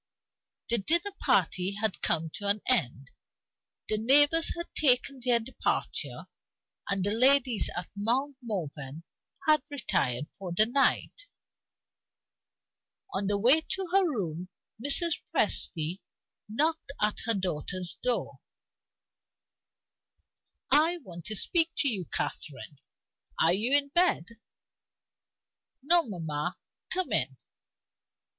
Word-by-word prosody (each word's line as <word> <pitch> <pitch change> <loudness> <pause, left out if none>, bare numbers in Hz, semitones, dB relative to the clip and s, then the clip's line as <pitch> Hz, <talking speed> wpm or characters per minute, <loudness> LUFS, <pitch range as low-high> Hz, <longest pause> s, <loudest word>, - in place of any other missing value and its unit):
The 235 -1 +6
dinner 340 - +3
party 185 +2 +1
had 215 -1 -1
come 160 -1 +1
to 205 - -4
an 205 +1 +2
end; 135 - 0 0.8
the 215 - +2
neighbors 290 +7 +4
had 340 - -7
taken 265 -1 +2
their 245 -2 +3
departure; 245 +3 -3 0.6
and 195 -2 0
the 205 - 0
ladies 255 0 +3
at 175 - -4
Mount 250 +8 -1
Morven 160 - -6 0.4
had 305 -2 +4
retired 150 - -1
for 185 -3 -6
the 215 +5 +4
night. 280 - 0 1.9
On 195 0 -1
the 205 0 0
way 255 +10 +4
to 375 +3 -4
her 390 +1 +4
room 180 - -4 0.3
Mrs. 310 +4 +2
Presty 165 +3 0 0.5
knocked 310 +6 -1
at 210 0 0
her 230 - +3
daughter's 180 0 -2
door. 245 -1 -1 2.3
"I 320 +4 +4
want 175 -5 -11
to 215 - -4
speak 330 - +2
to 285 - +3
you, 200 -9 0
Catherine. 145 -2 -5 0.6
Are 165 - +4
you 235 +9 +2
in 280 -1 -2
bed?" 345 - +2 1.6
"No, 345 +4 +5
mamma. 170 - -4 0.3
Come 370 -8 -2
in." 135 -9 0
220 Hz, 110 wpm, -28 LUFS, 180-285 Hz, 2.3 s, The